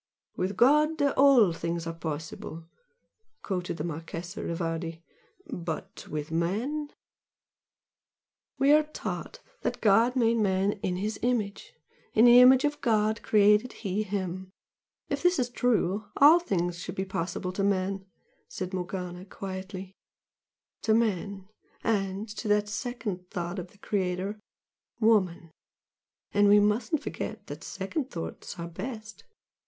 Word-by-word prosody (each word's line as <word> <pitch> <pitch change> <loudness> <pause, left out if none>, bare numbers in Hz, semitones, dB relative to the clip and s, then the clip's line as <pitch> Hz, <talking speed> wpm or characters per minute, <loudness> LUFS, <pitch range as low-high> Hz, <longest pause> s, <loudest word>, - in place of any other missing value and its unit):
"With 185 +1 -2
God 300 +6 +4
all 275 - +5
things 170 0 -3
are 165 - -3
possible!" 160 0 -6 0.8
quoted 180 -3 -3
the 150 - -3
Marchese 170 +4 -5
Rivardi 165 0 -3 0.4
"But 170 - -6
with 150 +1 -4
man 225 - -1 0.9
" - - -66
"We 275 +1 +4
are 305 +1 +7
taught 305 0 -6 0.2
that - - -2
God 225 +4 +4
made 235 -2 +3
man 195 -2 +2
'in 180 - -1
His 205 +3 -3
image. 225 -5 -1 0.4
In 225 - +7
the 240 0 +9
image 260 +2 +7
of 295 0 -1
God 220 -2 +2
created 210 +3 +4
He 195 +2 0
him.' 190 -2 -3 0.6
If - - -2
this 355 0 +3
is 245 -2 0
true, 215 -5 +1
all 305 +5 +8
things 175 - -1
should 180 +1 -6
be 190 - -2
possible 185 0 -3
to 195 +2 -2
man" 195 0 0 0.4
said 185 0 -5
Morgana, 180 -1 -4
quietly 190 0 -7 0.9
"To 220 -1 +3
man, 200 -3 -1 0.4
and 200 -1 0
to 220 - -4
that 210 0 +2
second 210 -5 -4
thought 175 +2 -4
of 180 - -6
the 205 - -22
Creator 195 +1 -2 0.6
Woman! 185 -7 +2 0.8
And 205 0 +5
we 205 +1 +7
mustn't 220 +8 +1
forget - - -5
that - - -8
second 300 -6 -4
thoughts 165 - -6
are 170 0 -5
best!" 215 +5 -7
200 Hz, 135 wpm, -28 LUFS, 180-230 Hz, 0.9 s, the